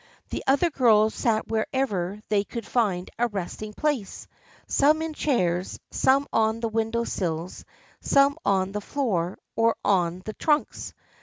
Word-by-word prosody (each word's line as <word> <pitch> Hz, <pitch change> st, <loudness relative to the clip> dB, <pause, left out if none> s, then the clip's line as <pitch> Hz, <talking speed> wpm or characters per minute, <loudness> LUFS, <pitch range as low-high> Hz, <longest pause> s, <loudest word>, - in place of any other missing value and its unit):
The -, -, -3 dB
other 285 Hz, +6 st, +3 dB
girls 220 Hz, -5 st, +4 dB
sat 220 Hz, -2 st, 0 dB
wherever 215 Hz, -4 st, -1 dB
they 205 Hz, -1 st, +2 dB
could 230 Hz, +1 st, -7 dB
find 200 Hz, -8 st, 0 dB
a 240 Hz, -, +3 dB
resting 210 Hz, +1 st, -5 dB
place, 285 Hz, -10 st, -2 dB, 0.4 s
some 300 Hz, +3 st, +3 dB
in 320 Hz, -1 st, -4 dB
chairs, 185 Hz, -, 0 dB
some 275 Hz, +2 st, +3 dB
on 220 Hz, 0 st, +2 dB
the 230 Hz, -1 st, -2 dB
window 225 Hz, +1 st, 0 dB
sills, 170 Hz, -5 st, -4 dB, 0.3 s
some 280 Hz, +2 st, +3 dB
on 190 Hz, -1 st, +1 dB
the 210 Hz, +1 st, -4 dB
floor 200 Hz, -9 st, -1 dB, 0.2 s
or 230 Hz, 0 st, +3 dB
on 180 Hz, -2 st, +1 dB
the 215 Hz, -, -5 dB
trunks. 300 Hz, +4 st, -1 dB
220 Hz, 145 wpm, -25 LUFS, 195-265 Hz, 0.4 s, girls